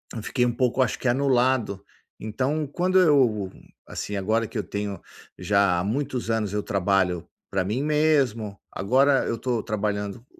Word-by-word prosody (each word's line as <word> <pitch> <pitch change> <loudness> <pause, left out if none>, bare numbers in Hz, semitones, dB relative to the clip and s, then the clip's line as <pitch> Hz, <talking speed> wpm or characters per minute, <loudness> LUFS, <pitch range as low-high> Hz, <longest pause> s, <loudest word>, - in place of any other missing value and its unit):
eu 115 - -4
fiquei 125 +3 0
um 120 - +1
pouco, 125 +1 0
acho 120 - -2
que, - - -2
anulado. 125 -5 +1 0.4
Então 135 +8 -2
quando 180 +6 0
eu, 125 - +3 0.3
assim, 105 - -5
agora 110 +4 0
que 120 - -7
eu 105 - -1
tenho 100 -1 -5 0.4
já 100 -3 +2
há - - -1
muitos 125 +3 -2
anos 110 -3 -1
eu 105 0 -1
trabalho 95 -3 0 0.2
pra 95 -1 0
mim 115 +8 -1
mesmo, 140 -9 +1
agora 135 +7 +3
eu 115 - -2
tô 120 -1 -1
trabalhando 105 +1 -3
115 Hz, 160 wpm, -25 LUFS, 100-130 Hz, 0.4 s, eu